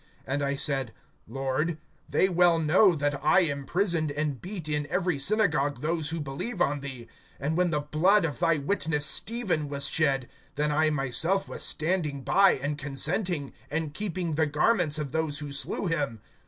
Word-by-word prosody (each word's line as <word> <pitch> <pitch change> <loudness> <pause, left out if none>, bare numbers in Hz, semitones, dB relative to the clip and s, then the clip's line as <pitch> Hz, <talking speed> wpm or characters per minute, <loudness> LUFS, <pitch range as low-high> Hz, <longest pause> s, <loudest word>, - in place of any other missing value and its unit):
(19)And 140 +2 -1
I 140 0 0
said: 135 -4 0 0.3
Lord, 135 +6 -2 0.3
they 190 - +3
well 175 -2 +4
know 170 +4 +4
that 145 -2 -2
I 175 +5 +5
imprisoned 165 +2 0
and 145 -2 -3
beat 180 -4 -7
in 150 -1 -2
every 180 -5 0
synagogue 150 - +1
those 160 0 0
who 165 0 -3
believe 150 - -4
on 145 -4 +1
thee; 130 -4 -8 0.3
(20)and 145 +3 -1
when 180 0 +2
the 150 -3 0
blood 165 +6 +3
of 150 - -4
thy 165 -2 +2
witness 150 -1 0
Stephen 185 - +1
was 140 -1 -2
shed, 135 -5 +1 0.3
then 150 +1 0
I 155 +1 +2
myself 155 +7 +1
was - - -6
standing 155 -4 -1
by, 195 +6 +5
and 145 +2 -3
consenting, 145 +2 -2 0.2
and 155 0 -2
keeping 185 -3 -3
the 155 +1 +1
garments 155 +1 +2
of 150 -3 -4
those 160 -2 -1
who 145 -1 -4
slew 140 +7 0
him. 145 - -1
150 Hz, 170 wpm, -27 LUFS, 140-175 Hz, 0.3 s, I